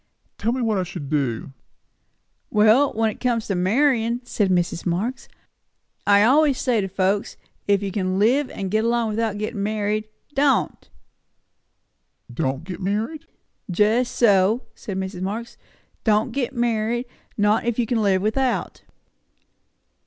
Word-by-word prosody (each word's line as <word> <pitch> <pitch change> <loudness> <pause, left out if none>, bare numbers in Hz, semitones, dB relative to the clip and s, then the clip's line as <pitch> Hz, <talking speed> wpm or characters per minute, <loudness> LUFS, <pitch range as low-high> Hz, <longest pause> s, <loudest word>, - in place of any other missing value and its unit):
"Tell 220 +3 0
me 255 +1 -2
what 220 -4 +1
I - - 0
shall 175 -3 -7
do." 135 -3 -2 1.0
"Well, 220 +7 +4
when 225 0 0
it - - -13
comes 235 -3 0
to 200 - -2
marryin'," 235 +4 +2
said 210 -5 0
Mrs. 175 -2 0
Marx, 215 +10 -2 0.8
"I 200 0 +6
always 280 +3 +4
say 240 -5 +1
to 195 - -2
folks, 195 +2 -1 0.3
If 200 0 +2
you 195 - -3
can 185 -1 -1
live 255 +7 +3
and 190 -2 -5
get 215 +1 +2
along 235 -1 +1
without 215 -1 -1
gettin' 210 0 -3
married 210 +1 -1 0.3
don't!" 275 0 +1 1.4
"Don't 135 +2 -2
get 185 +2 -7
married?" 220 - -2 0.4
"Just 215 +7 +2
so," 210 +1 +3
said 195 -3 -6
Mrs. 190 -1 -4
Marx. 215 +5 -4 0.5
"Don't 215 -1 +2
get 270 0 -2
married; 235 0 0 0.3
not 210 +2 +2
if 235 -2 -1
you 240 - +1
can 225 0 0
live 195 -2 +2
without." 250 +4 -1
215 Hz, 145 wpm, -23 LUFS, 195-240 Hz, 1.4 s, I